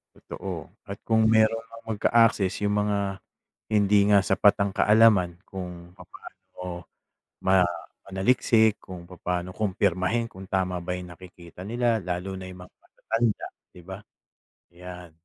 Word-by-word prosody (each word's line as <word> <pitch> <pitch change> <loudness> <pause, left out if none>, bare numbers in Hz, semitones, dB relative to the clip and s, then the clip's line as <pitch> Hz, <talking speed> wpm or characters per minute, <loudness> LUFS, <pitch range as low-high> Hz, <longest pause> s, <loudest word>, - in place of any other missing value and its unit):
Totoo, 90 -5 -7 0.2
at 100 0 -8
kung 110 -1 +4
meron 110 +1 +3
mang 115 -1 -6
magka-access 110 -3 +2
yung 105 0 +1
mga 100 -2 -1 0.5
hindi 100 -1 +3
nga 100 -2 +5
sapat 100 +1 +4
ang 100 - -2
kaalaman 105 -4 +4
kung 90 -3 -9
papaano 90 -1 -11 0.6
ma 95 0 +4 0.5
manaliksik, 110 +2 +2
kung 90 -2 -10
papaano 90 +1 -4
kumpirmahin 100 +3 -1
kung 95 0 -11
tama 90 -2 -1
ba 90 +1 -4
yung 90 -1 -9
nakikita 90 -1 -14
nila 115 +3 0
lalo 95 +1 -4
na 95 - -8
yung 90 0 -10
mga - - -19
matatanda, 115 -1 -2 0.2
'di 90 - -16
ba? 95 +1 -8 0.7
'Yan. 90 0 -11
95 Hz, 135 wpm, -26 LUFS, 90-105 Hz, 0.7 s, nga